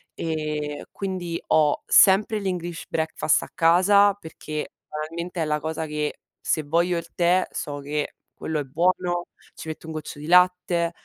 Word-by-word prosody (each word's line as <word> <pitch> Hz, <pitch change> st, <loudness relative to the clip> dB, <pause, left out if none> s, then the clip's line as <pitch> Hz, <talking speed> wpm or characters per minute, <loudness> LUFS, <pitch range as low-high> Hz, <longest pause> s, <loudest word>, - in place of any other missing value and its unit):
e 150 Hz, -2 st, -3 dB
quindi 180 Hz, -4 st, -4 dB
ho 150 Hz, -2 st, +3 dB
sempre 210 Hz, +2 st, +5 dB
l' -, -, -7 dB
English 175 Hz, -2 st, -4 dB
breakfast 160 Hz, -1 st, +1 dB
a -, -, -9 dB
casa 195 Hz, +5 st, +5 dB
perché 155 Hz, -4 st, -7 dB
banalmente 165 Hz, +3 st, -5 dB
è -, -, +1 dB
la 150 Hz, 0 st, -1 dB
cosa 160 Hz, +1 st, -3 dB
che 150 Hz, -1 st, -3 dB, 0.2 s
se 155 Hz, -, 0 dB
voglio 170 Hz, +4 st, +1 dB
il 170 Hz, 0 st, -5 dB
tè 180 Hz, +1 st, +3 dB
so 145 Hz, -1 st, -4 dB
che 145 Hz, +1 st, -3 dB, 0.3 s
quello 160 Hz, -1 st, -1 dB
è -, -, -2 dB
buono, 175 Hz, +4 st, 0 dB, 0.3 s
ci 160 Hz, -, -8 dB
metto 160 Hz, +1 st, -7 dB
un 160 Hz, -, -6 dB
goccio 155 Hz, -1 st, -7 dB
di 150 Hz, -, -8 dB
latte, 180 Hz, -1 st, +3 dB
165 Hz, 165 wpm, -24 LUFS, 155-180 Hz, 0.3 s, sempre